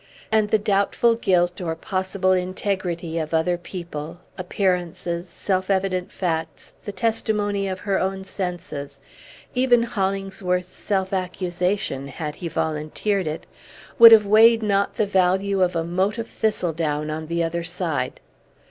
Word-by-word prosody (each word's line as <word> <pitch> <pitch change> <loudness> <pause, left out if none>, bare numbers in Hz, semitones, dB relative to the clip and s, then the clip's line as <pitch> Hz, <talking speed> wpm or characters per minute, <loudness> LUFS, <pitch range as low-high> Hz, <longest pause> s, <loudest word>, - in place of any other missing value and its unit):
And 215 -1 +3
the 220 - +4
doubtful 205 +3 +2
guilt 180 -5 +1
or 165 -2 -2
possible 185 +2 -1
integrity 180 -2 -1
of 160 0 -2
other 170 +2 +2
people, 170 -2 -7 0.2
appearances, 180 -2 -2
self 185 +2 -2
evident 190 -2 0
facts, 165 -3 -3
the 205 - -3
testimony 205 -1 0
of 185 -1 -4
her 200 -2 0
own 190 0 -2
senses, 170 -8 -5 0.5
even 250 -2 +4
Hollingsworth's 190 -4 -2
self 190 -1 -1
accusation, 180 -5 -2
had 150 +2 -5
he 175 - -5
volunteered 160 +5 -1
it, 155 +1 -4 0.5
would 230 -1 +12
have 220 -2 +8
weighed 225 +2 +6
not 200 -1 +1
the 215 - +1
value 190 0 +2
of 180 -1 +2
a 165 - 0
mote 185 +6 0
of 230 0 -4
thistledown 160 -8 -1
on 155 0 -5
the 170 +1 0
other 170 +1 -2
side. 170 -7 -3
185 Hz, 140 wpm, -23 LUFS, 170-200 Hz, 0.5 s, would